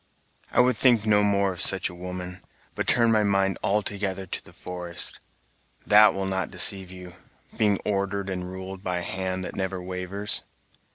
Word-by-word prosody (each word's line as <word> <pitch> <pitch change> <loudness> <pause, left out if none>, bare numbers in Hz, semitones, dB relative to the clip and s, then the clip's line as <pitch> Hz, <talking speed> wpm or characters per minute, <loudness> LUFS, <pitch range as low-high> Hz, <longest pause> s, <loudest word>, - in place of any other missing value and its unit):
"I - - +5
would 125 0 +3
think 120 -4 +4
no 105 -1 +4
more 100 -1 +1
of 90 - -4
such 95 -1 +3
a 90 - -9
woman, 90 0 -7 0.3
but - - -3
turn 115 -1 +4
my 110 -1 +3
mind 100 -2 +1
altogether 100 -1 -1
to 90 - -6
the - - -14
forest; 90 -1 -5 0.7
that 105 +1 +6
will 95 0 -2
not 95 -2 -2
deceive 95 -2 +4
you, 90 -1 -11 0.4
being 105 -2 +2
ordered 100 -1 -1
and 90 -1 -4
ruled 95 0 -8
by 90 -2 -2
a 90 - -3
hand 95 0 -3
that - - -7
never 95 -1 -3
wavers." 90 +3 -2
95 Hz, 175 wpm, -25 LUFS, 90-100 Hz, 0.7 s, that